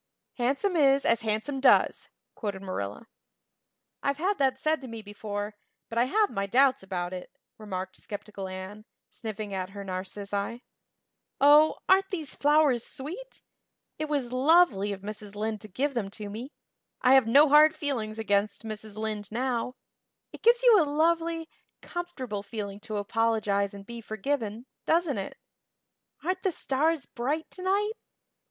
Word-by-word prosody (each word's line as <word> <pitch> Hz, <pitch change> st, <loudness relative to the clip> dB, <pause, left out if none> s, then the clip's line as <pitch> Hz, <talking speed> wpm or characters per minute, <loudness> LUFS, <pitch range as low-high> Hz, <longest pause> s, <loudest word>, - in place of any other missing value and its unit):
"Handsome 275 Hz, +10 st, +1 dB
is 275 Hz, -3 st, +4 dB
as 230 Hz, 0 st, +3 dB
handsome 220 Hz, +6 st, -1 dB
does," 265 Hz, -, +4 dB, 0.2 s
quoted 200 Hz, -3 st, -5 dB
Marilla. 145 Hz, -, -4 dB, 1.0 s
"I've 280 Hz, 0 st, 0 dB
had 380 Hz, +4 st, 0 dB
that 265 Hz, -1 st, +2 dB
said 310 Hz, +2 st, 0 dB
to 260 Hz, -, -8 dB
me 230 Hz, -2 st, -7 dB
before, 205 Hz, 0 st, -5 dB, 0.4 s
but 230 Hz, -, -1 dB
I 240 Hz, -, +4 dB
have 420 Hz, +10 st, +2 dB
my 195 Hz, 0 st, -2 dB
doubts 260 Hz, +5 st, +4 dB
about 185 Hz, -2 st, -4 dB
it," 180 Hz, -1 st, -7 dB, 0.3 s
remarked 190 Hz, -3 st, -5 dB
skeptical 205 Hz, -1 st, -7 dB
Anne, 190 Hz, +3 st, -8 dB, 0.3 s
sniffing 215 Hz, -2 st, -6 dB
at 185 Hz, -1 st, -3 dB
her 200 Hz, 0 st, -8 dB
narcissi. 200 Hz, +4 st, -4 dB, 0.8 s
"Oh, 295 Hz, +2 st, +6 dB
aren't 385 Hz, +1 st, +4 dB
these 320 Hz, -7 st, -4 dB
flowers 290 Hz, -5 st, +3 dB
sweet! 365 Hz, -, -8 dB, 0.6 s
It 310 Hz, -1 st, -2 dB
was 270 Hz, -5 st, -1 dB
lovely 260 Hz, -, +4 dB
of 195 Hz, -1 st, -5 dB
Mrs. 210 Hz, 0 st, -7 dB
Lynde 215 Hz, 0 st, -2 dB
to 215 Hz, -, -10 dB
give 275 Hz, +9 st, -1 dB
them 220 Hz, -6 st, -2 dB
to 210 Hz, -2 st, -6 dB
me. 240 Hz, +7 st, -7 dB, 0.5 s
I 255 Hz, +1 st, +6 dB
have 265 Hz, -4 st, +6 dB
no 285 Hz, +7 st, +7 dB
hard 300 Hz, +2 st, +7 dB
feelings 225 Hz, -7 st, -3 dB
against 205 Hz, -1 st, 0 dB
Mrs. 215 Hz, -1 st, -7 dB
Lynde 215 Hz, -1 st, -4 dB
now. 250 Hz, +1 st, -1 dB, 0.6 s
It -, -, -10 dB
gives 475 Hz, +1 st, +5 dB
you 455 Hz, -6 st, +7 dB
a -, -, +4 dB
lovely, 325 Hz, +2 st, +1 dB, 0.4 s
comfortable 265 Hz, -, -5 dB
feeling 200 Hz, -1 st, -6 dB
to 210 Hz, 0 st, -5 dB
apologize 205 Hz, -2 st, 0 dB
and 200 Hz, 0 st, -10 dB
be 235 Hz, +2 st, -8 dB
forgiven, 220 Hz, +1 st, -3 dB, 0.2 s
doesn't 325 Hz, -8 st, +2 dB
it? 195 Hz, -, -6 dB, 0.9 s
Aren't 370 Hz, +3 st, -1 dB
the 380 Hz, -, +1 dB
stars 310 Hz, 0 st, 0 dB
bright 285 Hz, +6 st, -3 dB
tonight? 395 Hz, +3 st, 0 dB
235 Hz, 150 wpm, -28 LUFS, 205-295 Hz, 1.0 s, no